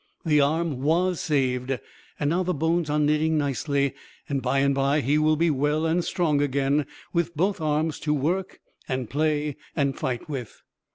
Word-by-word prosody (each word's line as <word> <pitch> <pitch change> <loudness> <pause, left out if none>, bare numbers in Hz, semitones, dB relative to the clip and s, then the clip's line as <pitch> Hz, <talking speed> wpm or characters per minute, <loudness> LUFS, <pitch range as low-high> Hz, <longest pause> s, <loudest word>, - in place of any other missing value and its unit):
The 150 -2 +4
arm 155 -1 0
was 175 +4 +1
saved; 130 -3 0 0.4
now 160 +5 +1
the 180 0 -1
bones 160 +2 0
are 150 - +1
knitting 155 +1 +2
nicely, 140 -1 0 0.3
and 140 -2 -1
by 130 +2 0
and 140 0 +3
by 140 +2 +2
he 145 +4 +2
will 155 0 +3
be 165 +1 +2
well 150 +3 +1
and 170 +2 +1
strong 160 -7 +1
again, 140 0 +1 0.3
with 170 -2 -1
both 190 +2 +1
arms 155 0 0
to 150 - 0
work 175 +7 -2 0.3
and 130 -3 -2
play 150 -1 0 0.2
and 140 -3 +1
fight 125 -2 -3
with. 135 -7 -6
150 Hz, 170 wpm, -25 LUFS, 140-160 Hz, 0.4 s, The